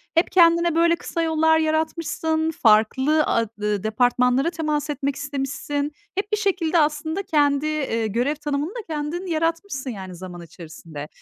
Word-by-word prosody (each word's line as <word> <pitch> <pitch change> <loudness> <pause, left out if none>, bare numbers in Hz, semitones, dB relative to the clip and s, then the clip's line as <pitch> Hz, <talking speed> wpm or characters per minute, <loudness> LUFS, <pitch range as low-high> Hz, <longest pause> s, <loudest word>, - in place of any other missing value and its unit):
Hep 330 - +2
kendine, 340 -1 +4
böyle, 335 0 +4
kısa 335 0 -4
yollar 320 0 +3
yaratmışsın, 320 0 -1
farklı 260 +5 +3
a 230 - +1
dı 210 -2 -1
departmanlara 250 +5 +2
temas 305 -3 -2
etmek 280 -1 -2
istemişsin. 285 +1 -3 0.2
Hep 400 +2 -3
bir 425 - +2
şekilde 365 -5 +1
aslında 310 +4 0
kendi, 290 -4 +2
eee, 270 -8 -1
görev 245 +8 0
tanımını 290 +1 -2
da 470 +4 -6
kendin 310 +4 -3
yaratmışsın, 330 -3 -2
yani, 190 -5 -7
zaman 175 0 -9
içerisinde. 160 -2 -10
300 Hz, 145 wpm, -23 LUFS, 250-325 Hz, 0.2 s, kendine